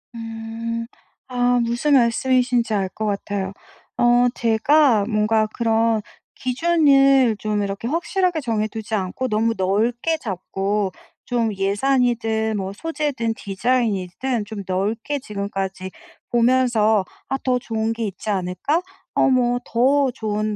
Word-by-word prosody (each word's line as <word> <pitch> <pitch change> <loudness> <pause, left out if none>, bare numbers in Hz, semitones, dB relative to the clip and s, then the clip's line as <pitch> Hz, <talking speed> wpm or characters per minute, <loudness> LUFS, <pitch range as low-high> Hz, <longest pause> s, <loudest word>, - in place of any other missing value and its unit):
음. 230 0 -5 0.4
아 245 0 +2
무슨 240 +5 +1
말씀이신지 245 -1 +2
알 195 -2 +1
거 215 - -5
같아요. 200 -1 -2 0.5
어 240 +1 +4
제가 235 0 +3
뭔가 215 0 +1
그런 225 -1 +1 0.3
기준을 275 -3 +4
좀 210 -1 -1
이렇게 200 +3 -4
확실하게 345 +3 0
정해두지 220 -2 -3
않고 195 +6 -2
너무 225 0 +1
넓게 230 - 0
잡고 195 - -2 0.3
좀 230 -3 0
예산이든 220 +1 +1
뭐 190 -1 -3
소재든 285 -4 -2
디자인이든 220 +1 -1
좀 205 -1 -7
넓게 215 +10 -1
지금까지 195 -5 -4 0.4
보면서 235 -4 +3 0.2
'아 270 - -1
더 250 -1 +1
좋은 225 -2 -2
게 230 0 -3
있지 200 +1 -6
않을까? 190 - 0 0.3
어 - - +4
뭐 245 -1 +2
더 270 +3 +2
좋은 215 -3 -2
230 Hz, 240 characters per minute, -21 LUFS, 210-250 Hz, 0.5 s, 어